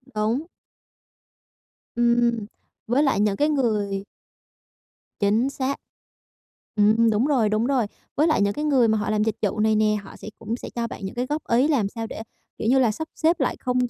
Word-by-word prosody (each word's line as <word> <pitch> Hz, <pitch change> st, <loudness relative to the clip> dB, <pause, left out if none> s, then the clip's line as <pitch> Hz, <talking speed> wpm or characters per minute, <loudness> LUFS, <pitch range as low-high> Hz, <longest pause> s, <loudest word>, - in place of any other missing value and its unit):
Đúng. 220 Hz, +8 st, 0 dB, 1.5 s
Ừm, 235 Hz, -2 st, +2 dB, 0.4 s
với 255 Hz, +5 st, +2 dB
lại 270 Hz, -9 st, +2 dB
những 205 Hz, -1 st, +2 dB
cái 295 Hz, +6 st, +1 dB
người 210 Hz, -8 st, 0 dB, 1.2 s
Chính 220 Hz, +6 st, +2 dB
xác, 275 Hz, 0 st, -2 dB, 1.0 s
ừm, 220 Hz, +2 st, +4 dB
đúng 220 Hz, +3 st, +2 dB
rồi, 255 Hz, -8 st, +2 dB
đúng 215 Hz, +2 st, +1 dB
rồi, 260 Hz, -5 st, +2 dB, 0.3 s
với 305 Hz, +3 st, +3 dB
lại 310 Hz, -, +2 dB
những 200 Hz, 0 st, +2 dB
cái 300 Hz, -, -3 dB
người 265 Hz, -6 st, +4 dB
mà 220 Hz, 0 st, +2 dB
họ 210 Hz, -, -2 dB
làm 215 Hz, 0 st, +1 dB
dịch 220 Hz, -1 st, 0 dB
vụ 210 Hz, 0 st, -1 dB
này 220 Hz, 0 st, +3 dB
nè, 215 Hz, 0 st, +3 dB
họ -, -, -12 dB
sẽ -, -, -11 dB
cũng 230 Hz, -, -3 dB
sẽ -, -, -8 dB
cho 235 Hz, -1 st, -1 dB
bạn 200 Hz, -, -7 dB
những 190 Hz, -, -6 dB
cái 245 Hz, +1 st, -1 dB
góp 300 Hz, +4 st, -2 dB
ý 245 Hz, +5 st, +4 dB
làm 250 Hz, -10 st, +1 dB
sao 225 Hz, +1 st, -5 dB
để, 220 Hz, -, -7 dB, 0.4 s
kiểu -, -, -3 dB
như 265 Hz, +2 st, +4 dB
là, 240 Hz, -4 st, +3 dB
sắp 315 Hz, +9 st, -5 dB
xếp 330 Hz, +2 st, +2 dB
lại -, -, 0 dB
không 250 Hz, -1 st, 0 dB
230 Hz, 200 wpm, -24 LUFS, 215-265 Hz, 1.5 s, ừm